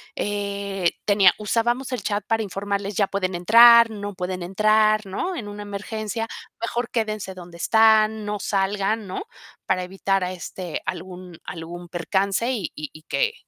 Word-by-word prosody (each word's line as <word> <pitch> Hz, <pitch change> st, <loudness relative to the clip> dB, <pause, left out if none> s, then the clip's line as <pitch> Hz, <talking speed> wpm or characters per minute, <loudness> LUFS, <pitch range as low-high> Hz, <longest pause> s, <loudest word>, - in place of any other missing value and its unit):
eh, 200 Hz, -3 st, -1 dB
tenía 200 Hz, -3 st, +5 dB
usábamos 240 Hz, +5 st, 0 dB
el 250 Hz, -5 st, -2 dB
chat 205 Hz, +1 st, -2 dB
para 225 Hz, -1 st, +1 dB
informarles: 200 Hz, 0 st, -3 dB
"Ya 200 Hz, -2 st, +2 dB
pueden 185 Hz, -2 st, -2 dB
entrar". 230 Hz, +5 st, +8 dB
"No 205 Hz, -1 st, -6 dB
pueden 180 Hz, 0 st, -4 dB
entrar", 215 Hz, +3 st, +3 dB
¿no? 350 Hz, -, -3 dB
"En 220 Hz, -, -5 dB
una 205 Hz, 0 st, -7 dB
emergencia, 215 Hz, +2 st, -4 dB, 0.3 s
mejor 235 Hz, +1 st, -2 dB
quédense 215 Hz, -4 st, -2 dB
donde 175 Hz, -2 st, -11 dB
están, 220 Hz, +1 st, +4 dB
no 210 Hz, 0 st, -3 dB
salgan", 200 Hz, +2 st, 0 dB
¿no? 185 Hz, -, -4 dB, 0.4 s
Para 185 Hz, -, 0 dB
evitar, 195 Hz, +1 st, -1 dB
ah, 180 Hz, -, -2 dB
este, 180 Hz, -1 st, -6 dB
algún 180 Hz, -1 st, -7 dB
algún 175 Hz, +1 st, -7 dB
percance 195 Hz, +7 st, 0 dB
y 210 Hz, -9 st, -3 dB
y 150 Hz, -1 st, -6 dB
y 155 Hz, -, -13 dB
que, 465 Hz, -, 0 dB
200 Hz, 155 wpm, -23 LUFS, 185-220 Hz, 0.4 s, entrar